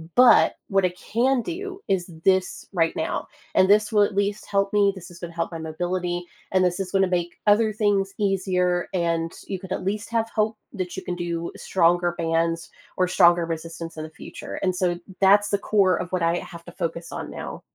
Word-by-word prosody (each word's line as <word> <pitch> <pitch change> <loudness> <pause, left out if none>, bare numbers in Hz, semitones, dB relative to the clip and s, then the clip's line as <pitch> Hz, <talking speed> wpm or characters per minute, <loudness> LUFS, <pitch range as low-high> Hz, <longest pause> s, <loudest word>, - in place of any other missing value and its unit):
but 250 -1 +6
what 195 -1 +2
I - - +3 0.2
can 250 +3 +3
do 380 - -5
is 190 -3 +1 0.2
this 190 -1 +1
right 165 -2 +1
now, - - -2 0.3
and 190 +1 +5
this 210 +1 +4
will 210 -1 +6
at 200 - -1
least 205 +1 0
help 200 0 0
me, 200 -1 +4
this 180 -1 -10
is 170 - -13
gonna 170 -1 -7
help 165 - -1
my 165 - -5
mobility, 175 +2 -2 0.3
and 185 -1 +3
this 180 0 0
is 185 - -5
gonna 195 -1 +3
make 175 0 -8
other 215 +1 +5
things 200 -2 +1
easier, 185 -3 +1
and 170 -2 0 0.2
you 190 -2 -3
could 190 -1 -11
at - - -2
least 205 +3 -2
have 230 -1 0
hope 215 0 +1 0.2
that 185 -1 -4
you - - -5
can 180 - -3
do 170 -1 -3
stronger 175 -1 +2
bands 165 0 0 0.3
or 185 -1 +3
stronger 175 -2 +5
resistance 165 0 -6
in 155 - -4
the 155 - -7
future." - - -8
And 185 -1 +1
so 175 -1 0 0.2
that's 205 +1 +5
the 200 - +2
core 195 -4 +3
of 180 - -5
what 180 -2 0
I 170 +1 +2
have 170 -1 -10
to 175 - -10
focus 170 -2 -4
on - - -5
now. - - -7
185 Hz, 210 wpm, -24 LUFS, 170-200 Hz, 0.3 s, but